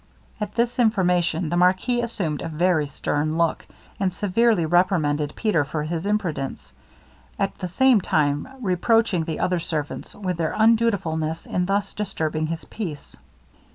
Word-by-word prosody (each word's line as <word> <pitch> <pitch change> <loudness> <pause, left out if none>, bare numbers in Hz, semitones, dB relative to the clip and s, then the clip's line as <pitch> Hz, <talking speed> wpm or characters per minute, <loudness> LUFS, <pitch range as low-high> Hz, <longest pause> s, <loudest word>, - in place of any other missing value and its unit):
At 210 -1 -4
this 235 +1 0
information, 180 -7 +2
the 175 - 0
marquis 185 +7 +3
assumed 180 -11 -3
a - - -3
very 160 -1 +1
stern 150 +2 -2
look, 170 -1 0 0.3
and 190 -2 +1
severely 205 0 +2
reprimanded 155 -4 +2
Peter 210 -9 +1
for 150 +1 -3
his 165 +4 -3
imprudence, 180 -10 -2 0.6
at 195 - 0
the 185 - -3
same 245 +4 +4
time 145 - +1
reproaching 190 -2 +2
the 160 -1 -4
other 180 -1 +1
servants 155 -3 -4
with 185 -4 -3
their 160 -2 -1
undutifulness 200 -9 +1
in 180 0 -1
thus 200 +1 0
disturbing 155 -6 -2
his 165 0 -5
peace. 170 -10 -6
180 Hz, 145 wpm, -23 LUFS, 160-205 Hz, 0.6 s, same